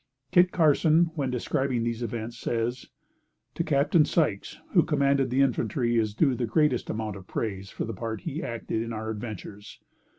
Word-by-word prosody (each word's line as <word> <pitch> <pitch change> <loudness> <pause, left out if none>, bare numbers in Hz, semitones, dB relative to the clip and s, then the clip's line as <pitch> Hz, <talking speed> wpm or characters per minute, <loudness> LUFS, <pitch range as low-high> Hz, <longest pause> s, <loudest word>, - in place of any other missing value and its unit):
Kit 180 0 +5
Carson, 160 +1 +4
when 140 -5 -2
describing 125 0 -1
these 115 0 -2
events, 115 0 -4
says: 120 +2 -2 0.7
"To 170 - -1
Capt. 145 +1 +1
Sykes, 145 - 0 0.2
who 175 - +6
commanded 140 -3 +2
the 130 +3 +2
infantry, 120 -2 +1
is 105 -2 -1
due 135 +1 +3
the 120 -1 -2
greatest 140 +1 +1
amount 110 -2 -3
of 95 -1 -13
praise 100 -3 -3
for - - -4
the 115 - -5
part 110 +2 -5
he 160 -1 -4
acted 115 -3 -3
in 115 0 -4
our 110 0 -4
adventures. 105 -2 -8
120 Hz, 170 wpm, -27 LUFS, 110-140 Hz, 0.7 s, who